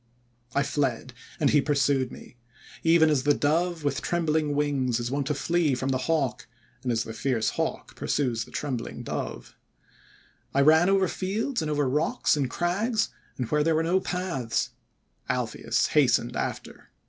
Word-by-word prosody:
"I 140 - +3
fled, 130 -3 -1 0.3
and 145 - +3
he 145 - +5
pursued 140 -3 +1
me; - - -12 0.5
even 165 -1 +5
as 145 -3 +2
the 145 +1 +3
Dove 165 +2 0
with 140 -4 -1
trembling 160 -3 0
wings 135 -5 +1
is 120 +1 -3
wont 140 0 -1
to 150 - 0
flee 165 -1 +1
from 130 +2 -2
the 130 -1 +1
Hawk, 150 -6 0 0.3
and 125 - -1
as 110 -2 +1
the 110 - -7
fierce 115 -1 0
Hawk - - -3
pursues 120 -6 -1
the - - -15
trembling 130 -5 -4
Dove. - - -5 1.0
"I 140 - +5
ran 160 +5 +6
over 195 -1 +3
fields 210 +7 -2
and 155 - -2
over 145 -2 +1
rocks 150 +5 +1
and 140 -4 0
crags, 205 - 0 0.3
and 125 - -2
where 150 0 +3
there 165 +1 +2
were 160 - +2
no 175 +3 +2
paths. 180 -10 -2 0.6
Alpheus - - 0
hastened - - +3
after. - - -5
145 Hz, 165 wpm, -27 LUFS, 130-165 Hz, 1.0 s, ran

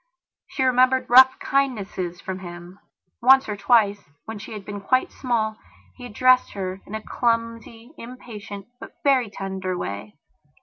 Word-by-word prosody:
She 265 - -2
remembered 255 0 +3
rough 260 +1 +8
kindnesses 200 -10 -2
from 190 0 -5
him. 175 +1 -10 0.4
Once 265 +2 +6
or 210 - -3
twice 205 -1 +2 0.2
when 220 -1 -7
she 205 - -9
had 205 -2 -8
been 205 -1 -7
quite 255 +6 +1
small 220 -4 -2 0.4
he 250 - -10
had 245 - -10
dressed 255 0 +4
her 190 -1 -5
in 215 - -6
a 220 - -6
clumsy, 230 +2 -3
impatient, 220 -5 -9
but - - -11
very 260 -5 +3
tender 190 -2 -4
way. 100 - -6
220 Hz, 150 wpm, -23 LUFS, 195-255 Hz, 0.4 s, rough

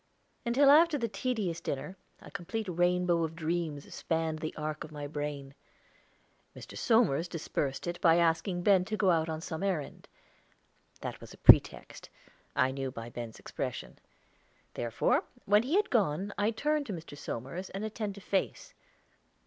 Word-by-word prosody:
Until 275 +4 +5
after 320 +1 +6
the 235 -4 -1
tedious 210 -8 -2
dinner, 140 +7 -4 0.3
a - - -12
complete 200 +4 -4
rainbow 175 -1 +2
of 160 0 -3
dreams 160 -3 -3
spanned 160 -1 -1
the 155 0 -3
arc 155 0 -3
of 155 - -10
my 145 -1 -6
brain. 145 -2 -5 1.0
Mr. - - -10
Somers 215 - +3
dispersed 145 -5 -3
it 175 0 -4
by 165 -2 +6
asking 175 +2 +1
Ben 195 -2 +5
to 215 +2 -3
go 195 -3 +4
out 160 -1 +1
on 160 0 -3
some 160 +1 -5
errand. 185 -8 -3 0.9
That - - -3
it - - -16
was - - -11
a - - -21
pretext, - - +5 0.5
I 130 +1 +3
knew 135 0 -3
by 115 -2 -8
Ben's 115 -2 -7
expression; - - -6 0.7
therefore, 120 - +1 0.2
when 205 +1 +5
he 270 +9 -1
had 410 0 +2
gone 200 - +1
I 205 +1 +1
turned 295 +6 0
to 210 - -3
Mr. 165 -4 -8
Somers 145 +7 -6
an 195 +2 -5
attentive 210 -2 -4
face. 195 0 -2
175 Hz, 160 wpm, -31 LUFS, 155-210 Hz, 1.0 s, after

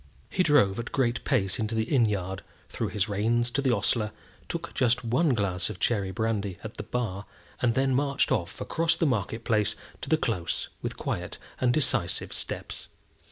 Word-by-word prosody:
He 185 - +2
drove 145 - +4
at 120 - -4
a - - -23
great 125 -3 +1
pace 100 -9 +1
into 110 +1 -1
the 110 - +2
inn 120 0 +3
yard, 95 -3 -2 0.3
threw - - -2
his 105 -1 0
reins 115 +4 +1
to 140 - +1
the 135 - +2
ostler, 110 0 +1 0.4
took 170 0 -4
just 125 -2 +2
one 130 +4 +3
glass 100 -3 0
of 100 -4 -7
cherry 100 -5 +1
brandy 105 -2 -1
at 110 0 -7
the - - -3
bar, 105 -5 -3 0.3
and 120 -2 +2
then 135 0 +2
marched 140 +1 +2
off 85 -5 -1
across 165 +1 +1
the 165 - +1
market 115 -3 0
place 105 -3 +2 0.3
to - - -5
the 160 - +5
Close, 100 - -2
with - - -4
quiet - - -3 0.2
and 125 -1 +3
decisive 120 - +1
steps. - - -5
115 Hz, 190 wpm, -28 LUFS, 100-130 Hz, 0.4 s, the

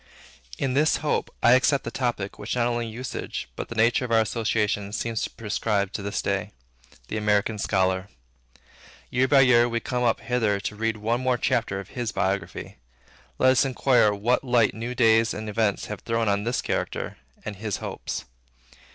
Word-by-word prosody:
In 130 - -1
this 150 +4 +3
hope, 150 - 0
I 120 - +7
accept 130 +2 +4
the 115 - -5
topic 115 -7 -2
which 105 +4 -3
not 120 -1 +2
only 120 -1 -1
usage, 120 +3 -5
but - - -6
the 115 - -6
nature 115 +3 +3
of 125 - -4
our 115 -1 +5
association, 105 -2 -1
seem 115 +1 -2
to 110 - -2
prescribe 105 -2 -1
to - - -3
this 100 0 -3
day, 100 -2 -2 0.6
the 110 - -2
AMERICAN 105 0 +1
SCHOLAR. 95 -1 0 1.0
Year 130 +1 +2
by 135 0 +6
year, 120 -2 +5
we 115 0 -1
come 125 +1 -3
up 120 -2 +2
hither 110 -5 0
to 100 +2 -4
read 110 +1 -1
one 115 +4 -1
more 130 -1 +1
chapter 115 -5 0
of 100 0 -9
his 120 -3 -3
biography. 95 0 -2 0.6
Let 130 - +5
us 130 - +4
inquire 130 -4 +3
what 110 +6 +1
light 120 -4 +3
new 120 +3 -5
days 115 -2 +4
and 110 +1 -5
events 105 -1 0
have 105 -2 -6
thrown 115 -1 -1
on 100 0 +1
his 120 +1 -1
character, - - -3 0.3
and 105 -2 -5
his 105 0 -3
hopes. - - -5
115 Hz, 185 wpm, -25 LUFS, 105-120 Hz, 1.0 s, I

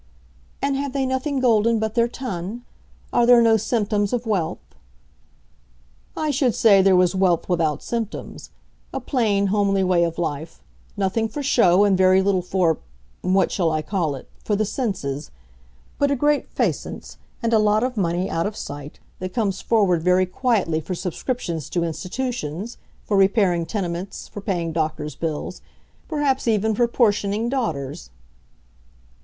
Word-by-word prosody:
"And 280 0 +1
have 280 -1 -3
they 275 -1 0
nothing 260 +2 -1
golden 230 -2 +3
but 220 0 -2
their 235 0 +3
ton? 235 -3 -5 0.5
Are 235 - +3
there 245 -1 +8
no 230 -1 +5
symptoms 210 -1 0
of 240 -1 -1
wealth?" 195 -7 -1 1.6
"I 310 -1 0
should 260 -4 +1
say 200 -4 +6
there 190 0 +5
was 180 0 +4
wealth 185 -3 +2
without 160 -5 0
symptoms. 230 -3 -5 0.5
A - - 0
plain, 215 -7 +1
homely 200 -2 +2
way 180 -2 +3
of 165 -1 -2
life: 155 - -4 0.3
nothing 205 +3 0
for 285 +6 -5
show, 200 -8 +4
and 200 -2 +4
very 185 0 +5
little 195 -2 +2
for—what 165 - -1
shall 170 -4 +1
I 155 0 -1
call 160 -4 -1
it?—for 205 - -5
the 215 +1 +1
senses; 185 - -3 0.7
but 285 - +3
a 280 - +2
great 295 +2 +1
aisance, - - -2 0.3
and 230 0 +1
a 220 - +5
lot 215 +1 +3
of 250 0 -1
money, 180 -2 0
out 165 +4 -1
of 210 - -6
sight, 145 0 -8 0.2
that 185 +3 -6
comes 200 -5 0
forward 195 -7 +2
very 180 +2 +3
quietly 185 -6 0
for 180 +4 -4
subscriptions 175 - -3
to 175 - 0
institutions, 185 - -4 0.3
for 205 - 0
repairing 190 -4 +3
tenements, 180 -1 -4
for 205 - -8
paying 175 -4 -2
doctor's 155 -1 -2
bills; 165 +2 -4 0.5
perhaps 290 -5 0
even 220 -1 +2
for 240 +3 +2
portioning 215 -1 +1
daughters." 140 - -3
200 Hz, 150 wpm, -22 LUFS, 170-230 Hz, 1.6 s, there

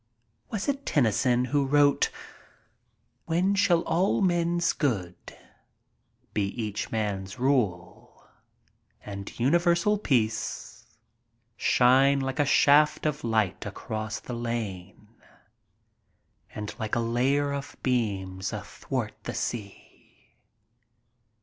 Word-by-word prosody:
Was 210 -3 -3
it 280 0 -1
Tennyson 125 - +2
who 140 +3 +1
wrote: 145 +1 +3 1.2
When 175 +4 +1
shall 180 -4 +3
all 180 +4 +1
men's 175 -2 +1
good 100 - -3 1.0
Be 105 - +1 0.2
each 105 -2 -3
man's 100 -3 -3
rule, 110 -10 -1 0.8
and 100 +1 -8
universal 170 - +2
peace 110 - -1 0.7
Shine 135 +4 +4
like 135 0 -3
a 145 - +4
shaft 145 +2 +4
of 150 -1 -1
light 110 -5 0
across 110 -1 -5
che 125 - -7
lare, 110 -6 -4 1.6
And 105 0 -5
like 110 -1 -2
a - - +1
layer 135 +5 +1
of 140 0 -6
beams 95 -7 -1
athwart - - -4
the - - -4
sea? 105 -4 -7
125 Hz, 100 wpm, -27 LUFS, 105-145 Hz, 1.6 s, Shine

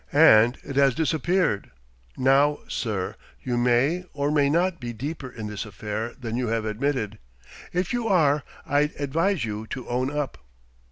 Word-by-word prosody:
And 120 -6 +6
it 140 - -6
has 135 -3 +4
disappeared. 160 - +1 0.5
Now, 140 +3 +3
sir, 100 -6 -3 0.3
you 125 - -1
may 125 +8 +2
or 145 0 0
may 145 -2 +3
not 170 +3 +1
be 120 -1 -5
deeper 135 +3 -5
in 115 -3 -7
this 105 -1 -4
affair 110 +2 -5
than 115 -3 -4
you 125 0 -1
have 115 0 -1
admitted. 110 -1 -2 0.5
If 180 +3 -1
you 240 -2 -1
are, 150 -7 +3 0.2
I'd 145 +1 +1
advise 165 +3 +1
you 110 0 -5
to 130 +1 -6
own 125 +2 0
up." 145 - -3
135 Hz, 160 wpm, -25 LUFS, 115-150 Hz, 0.5 s, And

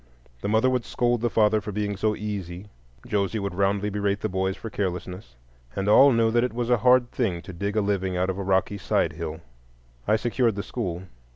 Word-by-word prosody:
The - - -3
mother 110 +4 +3
would 125 -2 +1
scold 120 -1 0
the 120 - +1
father 110 -1 +3
for 105 - -6
being 100 0 -2
so 105 +2 0
"easy"; 100 -2 -6 0.4
Josie 100 +1 -1
would 100 -2 -3
roundly 100 +2 0
berate 100 0 -1
the 110 - -1
boys 95 +1 -1
for 115 - -7
carelessness; 90 -8 -4 0.4
and 95 +1 -2
all 135 +7 +7
knew 115 -2 +3
that 120 +1 +3
it 125 - -1
was 120 +1 -2
a 120 - +5
hard 125 +2 +4
thing 100 -9 -1
to 95 - -9
dig 100 +4 -3
a 110 - +3
living 95 -2 -1
out 90 +1 +1
of 95 - -6
a - - -2
rocky 95 +1 0
side - - 0
hill. 80 0 -6 0.7
I 110 - +4
secured 115 0 +1
the 100 - -3
school. 90 -7 -4
105 Hz, 215 wpm, -25 LUFS, 95-115 Hz, 0.7 s, all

